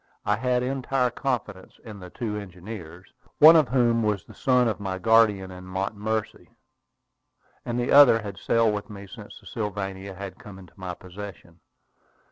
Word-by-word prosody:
I 105 - +2
had 125 +2 0
entire 130 -1 -1
confidence 110 -8 -4
in 105 -3 -10
the 90 -1 -10
two 110 +1 -4
engineers, 90 -2 -9 0.2
one 160 +2 +9
of 155 -4 +5
whom 120 -2 +2
was 105 -4 0
the - - -14
son 125 -2 +2
of 110 - -2
my 95 -2 -4
guardian 105 -2 +3
in 90 0 -10
Montomercy, 105 +3 -4 1.1
and 120 -1 -3
the 120 - -1
other 135 -6 +7
had 100 -2 -7
sailed 115 -2 +2
with 105 +2 -5
me 100 -1 -9
since 95 - -12
the - - -22
Sylvania 100 -2 -5
had 95 +1 -8
come 105 -6 -11
into 90 -3 -15
my 90 -2 -6
possession. 95 -2 -11
105 Hz, 165 wpm, -25 LUFS, 95-120 Hz, 1.1 s, one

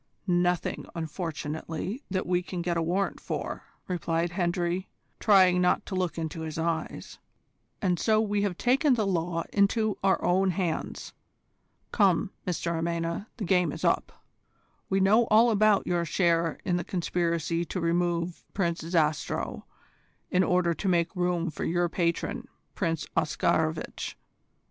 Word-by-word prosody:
"Nothing, 175 -1 0
unfortunately, 160 - -4
that 185 -1 -1
we 180 0 +1
can 180 -1 -5
get 175 0 0
a 165 - +1
warrant 180 +4 0
for," - - -4 0.2
replied 170 -1 -1
Hendry, 175 0 -1 0.3
trying 185 -4 +5
not 180 - +2
to - - -7
look 185 -2 -1
into 160 0 -4
his 160 -1 -5
eyes, 165 -1 -3 0.6
"and 180 -3 +2
so 215 -1 +3
we 205 -2 +1
have 195 -4 -1
taken 260 +2 +3
the 220 -3 0
law 170 -2 -1
into 210 +1 +2
our 195 -1 +3
own 190 +2 +3
hands. 175 -3 -3 0.8
Come, 195 -2 +3 0.2
Mr 170 -1 -1
Amena, 170 +3 -2
the 225 - -4
game 180 -3 +3
is - - -4
up. - - 0 0.6
We 195 - +2
know 210 +5 +5
all 225 +2 +5
about 210 -1 +4
your 175 -1 +1
share 170 -1 +1
in 180 -2 +1
the 175 - -2
conspiracy 170 -2 -1
to 185 - -4
remove 170 0 0
Prince 170 -4 0
Zastrow 160 -2 -1 0.7
in 185 +1 +4
order 180 -2 +2
to 195 - -4
make 170 0 +1
room 175 -2 0
for - - -5
your 175 +1 +1
patron 170 -1 -1 0.3
Prince 165 -5 -1
Oscarovitch. 155 +1 0
175 Hz, 145 wpm, -28 LUFS, 170-190 Hz, 0.8 s, trying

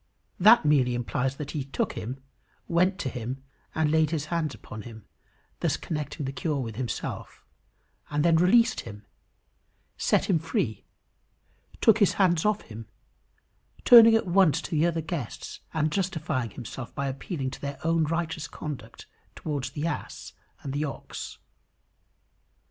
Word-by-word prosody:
That 215 -1 +7
merely 130 -5 +3
implies 130 +2 -1
that 145 0 -6
he 145 - -3
took 135 - -2
him, 125 +4 -6 0.4
went 180 +3 +2
to - - -2
him 125 +2 -5 0.3
and 155 -1 +2
laid 160 -1 +3
his 155 -2 -2
hands 160 -4 -1
upon 105 - -9
him, 110 -2 -11 0.5
thus - - 0
connecting 150 -1 -4
the 135 - -2
cure 140 +3 -2
with 115 -4 -4
himself, 120 -1 -5 0.6
and 150 +1 0
then 165 -1 +5
released 220 +7 +4
him, 105 0 -9 0.9
set - - +2
him 180 -5 +3
free, 160 - -2 1.0
took 225 -1 +5
his 205 - +4
hands 175 -3 +2
off 210 0 +2
him, 115 0 -10 1.0
turning 230 -2 +9
at 225 - +2
once 180 -3 +4
to - - -7
the 160 +1 +3
other 165 -1 -1
guests 160 - -5
and 155 -1 0
justifying 160 - -1
himself 120 +1 -8
by 140 - -2
appealing 135 0 -4
to - - -9
their 140 -1 -4
own 165 0 +2
righteous 165 0 -2
conduct 130 -7 -8 0.3
towards 145 -4 -3
the 150 - -4
ass 170 - -5 0.3
and 135 - -4
the 145 +2 -1
ox. 140 - -6
150 Hz, 150 wpm, -27 LUFS, 130-170 Hz, 1.0 s, turning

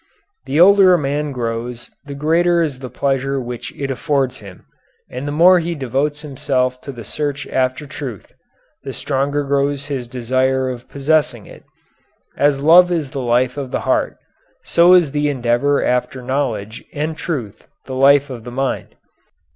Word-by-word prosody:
The 140 +4 -1
older 190 0 +7
a - - +2
man 145 0 -2
grows 120 -1 -5
the 140 -1 -7
greater 170 +4 +2
is 140 -5 -4
the 130 -1 -7
pleasure 135 +2 -1
which 120 -1 -6
it 140 -1 -2
affords 135 -1 -1
him, 95 -3 -13 0.5
and 130 +3 -5
the - - -2
more 175 +4 +6
he 170 0 -3
devotes 140 +2 -2
himself 130 -3 -2
to 140 - -7
the 120 -3 -9
search 145 +4 -3
after 130 +2 -1
truth, 130 -6 -8 0.5
the 135 0 -7
stronger 140 +3 -1
grows 140 0 0
his 135 -4 -4
desire 130 +2 0
of 125 -1 -10
possessing 150 +2 0
it. - - -15 0.7
As 140 -1 +2
love 175 +3 +7
is 155 -6 -2
the 135 - -4
life 125 +2 +1
of 140 -2 -4
the - - -2
heart, - - 0 0.5
so 170 +2 +5
is 170 -6 +3
the 145 0 0
endeavor 130 +1 +1
after 125 +1 -1
knowledge 120 -5 -3
and 155 +2 -2
truth 130 - -5 0.2
the 130 - -7
life 140 +1 +4
of 120 -3 -8
the 120 - -8
mind. 135 +2 -3
135 Hz, 165 wpm, -18 LUFS, 125-150 Hz, 0.7 s, older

